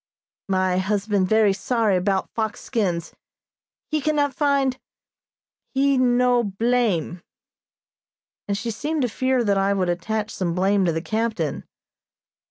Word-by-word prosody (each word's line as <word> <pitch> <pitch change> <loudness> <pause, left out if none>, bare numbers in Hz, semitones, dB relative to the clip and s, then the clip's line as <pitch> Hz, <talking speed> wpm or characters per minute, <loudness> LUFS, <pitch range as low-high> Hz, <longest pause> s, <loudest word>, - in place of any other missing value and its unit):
"My 185 -1 +1
husband 200 0 0
very 220 -2 +4
sorry 210 -1 +1
'bout 190 +1 -1
fox 220 -2 -3
skins. 180 -9 -2 0.8
He 310 -1 0
cannot 290 -2 +1
find 275 -2 +1 1.0
he 275 +1 +3
no 250 -1 +3
blame," 205 -5 0 1.3
and 200 0 -1
she 230 +3 -3
seemed 295 +6 -2
to - - +2
fear 260 +2 0
that 200 -3 +2
I 195 +1 +2
would 185 -2 0
attach 210 +5 -2
some 175 -3 -2
blame 195 +1 +2
to 170 - +2
the 160 0 -3
captain. 220 -8 -2
215 Hz, 130 wpm, -23 LUFS, 190-250 Hz, 1.3 s, very